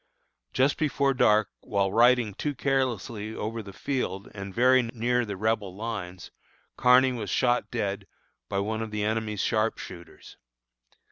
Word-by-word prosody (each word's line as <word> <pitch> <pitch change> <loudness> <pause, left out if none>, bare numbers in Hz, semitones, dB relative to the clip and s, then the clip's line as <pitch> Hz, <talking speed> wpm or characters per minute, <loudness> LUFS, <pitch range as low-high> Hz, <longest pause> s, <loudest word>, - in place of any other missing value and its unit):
Just 135 +2 +2
before 140 -3 +1
dark, 105 -4 +3
while 100 -2 -1
riding 120 -1 +4
too 145 +7 -3
carelessly 120 -5 -1
over 115 +2 -4
the 100 -2 -10
field 100 -5 -3
and 100 -1 -7
very 130 +5 +4
near 120 +1 0
the 100 -3 -5
rebel 105 -2 -1
lines, 100 -5 -6 0.4
Kearny 130 +1 +5
was 115 -5 -4
shot 125 -1 +1
dead 100 -4 -3 0.4
by 100 - -2
one 110 +3 -1
of 115 - -4
the 105 -1 -3
enemy's 110 -1 -1
sharpshooters. 100 -5 -3
110 Hz, 140 wpm, -27 LUFS, 100-125 Hz, 0.4 s, Kearny